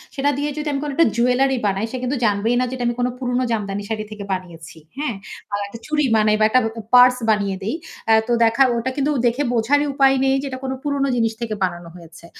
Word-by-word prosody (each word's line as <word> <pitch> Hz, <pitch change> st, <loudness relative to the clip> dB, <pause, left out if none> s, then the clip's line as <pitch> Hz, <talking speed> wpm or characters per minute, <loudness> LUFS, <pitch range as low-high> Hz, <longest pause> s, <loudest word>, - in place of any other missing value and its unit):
সেটা 280 Hz, +1 st, +1 dB
দিয়ে 295 Hz, +1 st, -1 dB
যদি 300 Hz, 0 st, -3 dB
আমি 275 Hz, -, -1 dB
কোনো 295 Hz, -, -3 dB
একটা 330 Hz, -, +4 dB
জুয়েলারি 250 Hz, +2 st, +2 dB
বানাই 195 Hz, +1 st, 0 dB
সে 260 Hz, -, -4 dB
কিন্তু 260 Hz, +3 st, -1 dB
জানবেই 215 Hz, +3 st, +1 dB
না -, -, +2 dB
যে -, -, -7 dB
এটা 245 Hz, -1 st, -3 dB
আমি 240 Hz, -, -1 dB
কোনো 245 Hz, 0 st, 0 dB
পুরোনো 250 Hz, 0 st, -1 dB
জামদানি 205 Hz, -2 st, -2 dB
শাড়ি 215 Hz, -1 st, -2 dB
থেকে 210 Hz, -1 st, -7 dB
বানিয়েছি। 170 Hz, -3 st, -8 dB, 0.2 s
হ্যাঁ? 285 Hz, -7 st, -2 dB, 0.4 s
আ -, -, +2 dB
একটা 225 Hz, +3 st, -10 dB
চুরি 300 Hz, -2 st, 0 dB
বানাই 215 Hz, 0 st, +3 dB
বা -, -, +3 dB
একটা 255 Hz, -, +4 dB
ব -, -, +1 dB, 0.3 s
পার্স 250 Hz, 0 st, +7 dB
বানিয়ে 200 Hz, -3 st, +1 dB
দেই। 220 Hz, +9 st, -2 dB, 0.4 s
আ -, -, +7 dB
তো -, -, -2 dB
দেখা 230 Hz, +4 st, +4 dB
ওটা 235 Hz, +2 st, -1 dB
কিন্তু 285 Hz, +1 st, +1 dB
দেখে 240 Hz, +5 st, +1 dB
বোঝারই 285 Hz, +6 st, +2 dB
উপায় 270 Hz, -1 st, +4 dB
নেই 270 Hz, 0 st, +3 dB
যে -, -, -6 dB
এটা 260 Hz, 0 st, -6 dB
কোনো 265 Hz, 0 st, -3 dB
পুরোনো 280 Hz, -1 st, 0 dB
জিনিস 225 Hz, -1 st, +1 dB
থেকে 220 Hz, -2 st, -3 dB
বানানো 175 Hz, -2 st, -3 dB
হয়েছে। 170 Hz, -1 st, -14 dB
240 Hz, 235 wpm, -20 LUFS, 210-270 Hz, 0.4 s, পার্স